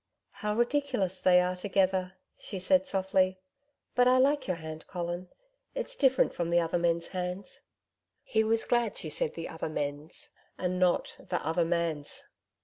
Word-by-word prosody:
'How 210 +1 -3
ridiculous 240 -6 0
they 180 -1 +6
are 180 0 0
together!' 185 -1 +1 0.2
she 200 - -7
said 275 +10 +3
softly 190 -3 +1 0.6
'But 250 0 +4
I 255 0 +5
like 280 +3 +3
your 185 - 0
hand, 160 -1 -8
Colin. 175 0 -4 0.5
It's - - -3
different 265 - +3
from 170 -1 -2
the 170 0 +4
other 170 +1 0
men's 170 0 0
hands.' 180 +1 -5 0.6
He 220 0 +1
was 225 +1 +2
glad 240 -3 +1
she 155 - -3
said 150 - -1
'the 165 - -5
other 160 -1 -4
men's,' 145 +1 -5 0.3
and 180 0 -1
not 180 -1 +2
'the - - -3
other 165 +2 +1
man's'. 165 -3 -2
185 Hz, 160 wpm, -30 LUFS, 170-220 Hz, 0.6 s, they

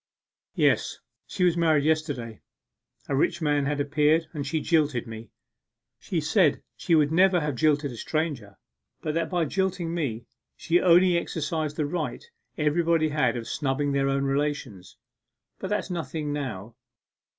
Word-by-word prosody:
'Yes, - - +2 0.3
she 185 - -2
was 175 -2 +4
married 160 -4 +3
yesterday! 145 -8 -1 0.7
A 140 - -1
rich 170 +5 +1
man 145 -3 +1
had 145 0 -1
appeared, 150 +3 +2
and 145 -3 -4
she 160 +2 -1
jilted 150 -6 +1
me. 115 -1 -9 0.7
She 180 -5 -2
said 160 0 +2
she 170 - +1
never 170 +5 +4
would 165 - 0
have 150 -1 -1
jilted 145 +1 +1
a - - -8
stranger, 140 -7 -3 0.5
but 155 - -2
that 165 0 -1
by 175 -3 0
jilting 180 0 -1
me, 125 -9 -3 0.3
she 170 +1 +1
only 175 0 +5
exercised 155 -2 -3
the 150 - -1
right 160 - -4 0.3
everybody 160 +1 +2
has 135 -6 +1
of 115 -2 -5
snubbing 140 +1 -1
their 135 0 +1
own 135 0 0
relations. 135 -9 -3 0.6
But 190 - -4
that's 210 -2 -2
nothing 155 -3 -3
now. 120 -6 -5
150 Hz, 150 wpm, -26 LUFS, 140-165 Hz, 0.7 s, only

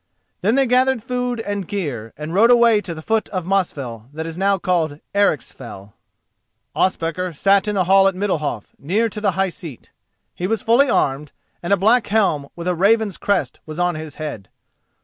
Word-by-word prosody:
Then 215 +5 +2
they 270 0 +3
gathered 255 -1 +2
food 250 -1 -2
and 205 -4 -4
gear, 140 - -4
and 150 +2 -6
rode 220 +5 +5
away 235 -3 +5
to 170 -5 -6
the 155 - -9
foot 220 +3 0
of 185 -3 -4
Mosfell 140 - -2
that 160 +1 -5
is 165 -1 -6
now 195 +2 +1
called 170 -5 -1 0.2
Ericsfell. 125 - -2 0.8
Ospakar 180 -1 -1
sat 195 +5 +3
in 210 - -1
the 190 - +2
hall 195 +2 +5
at 195 - 0
Middalhof, 155 - -2
near 210 +10 0
to 210 - -7
the 200 -3 +1
high 190 +1 0
seat. 165 - -11 0.4
He 180 - -3
was 225 +1 -1
fully 255 +5 +4
armed, 140 - 0 0.3
and 175 - -4
a 200 - +5
black 220 +5 +3
helm 190 -10 +1
with 170 +1 -6
a 180 - +2
raven's 205 +2 +2
crest 200 -2 -1
was 155 0 -7
on 175 0 +1
his 155 -1 -7
head. 145 - -6
190 Hz, 190 wpm, -20 LUFS, 155-210 Hz, 0.8 s, rode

